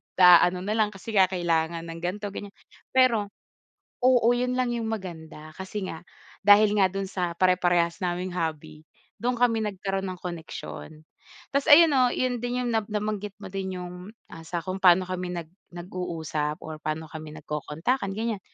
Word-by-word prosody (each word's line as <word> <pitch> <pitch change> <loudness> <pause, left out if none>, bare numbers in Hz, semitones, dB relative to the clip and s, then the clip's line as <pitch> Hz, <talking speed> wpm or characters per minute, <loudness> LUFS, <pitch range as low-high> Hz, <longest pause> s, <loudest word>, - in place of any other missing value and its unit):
naaano 180 0 +6
nalang 215 +1 +1
kasi 210 +4 -8
nga 190 -3 +6
kailangan 170 -2 -1
ng 165 0 -7
ganto 200 +3 -3
ganyan. 200 0 -8 0.4
Pero 235 -6 +4 0.7
oo 245 -2 +4
yun 250 +1 0
lang 250 -1 0
yung 230 -2 -2
maganda 160 -7 -7
kasi 190 +1 -5
nga 165 +2 -10 0.3
dahil 205 +1 +6
nga 190 - +6
dun 195 +1 -4
sa 180 -3 -2
pare-parehas 175 -1 +2
naming 180 0 -2
hobby 160 -2 -4 0.3
dun 245 +2 0
kami 235 -2 +2
nagkaroon 195 -1 -3
ng 185 -1 -7
koneksyon. 160 -2 -7 0.5
Tas 280 0 0
ayun 325 +1 +8
no 260 -3 +4
yun 245 0 -1
din 245 +1 -2
yung 245 - -1
na 225 - +3
nabanggit 210 -1 -3
mo 190 - -8
din 190 -1 -4
yung, 180 +4 -8 0.2
ah, 165 0 -11
sa 170 -1 -3
kung 185 0 -4
pano 185 -1 +6
kami 185 0 -4
nag 165 -2 -6 0.2
nag 175 +1 -8
uusap 160 -4 -3
or 155 -1 -7
pano 155 +1 -3
kami 155 -1 -8
nagkokontakan 160 - -2
ganyan. 225 -2 -2
185 Hz, 170 wpm, -26 LUFS, 170-215 Hz, 0.7 s, ayun